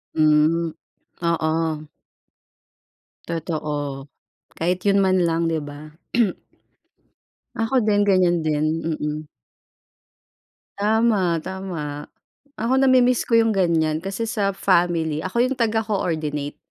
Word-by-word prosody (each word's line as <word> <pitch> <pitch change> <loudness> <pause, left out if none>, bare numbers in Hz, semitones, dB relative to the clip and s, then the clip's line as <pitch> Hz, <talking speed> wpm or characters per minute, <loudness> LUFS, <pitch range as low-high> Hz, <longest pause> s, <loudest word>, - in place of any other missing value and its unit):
Hmm. 155 +2 +3 0.5
Oo. 160 -2 -1 1.4
Totoo. 150 -4 -4 0.5
Kahit 180 +2 0
yun 200 0 +4
man 185 -1 +3
lang, 165 0 +1
di 165 -1 0
ba? 145 +1 -9 1.7
Ako 225 +4 -1
din 205 -1 +3
ganyan 185 -3 +3
din, 150 0 +1 0.2
mm. 150 -2 -2 1.6
Tama, 205 -6 +2
tama. 170 -6 -5 0.5
Ako 235 +4 +1
namimiss 255 -2 +4
ko 230 -1 +3
yung 225 -2 +2
ganyan 160 -3 +1
kasi 195 +4 -3
sa 205 -3 0
family, 170 -5 +1
ako 185 +4 -6
yung 265 - -2
taga-coordinate. 175 - -1
170 Hz, 95 wpm, -22 LUFS, 155-200 Hz, 1.7 s, yun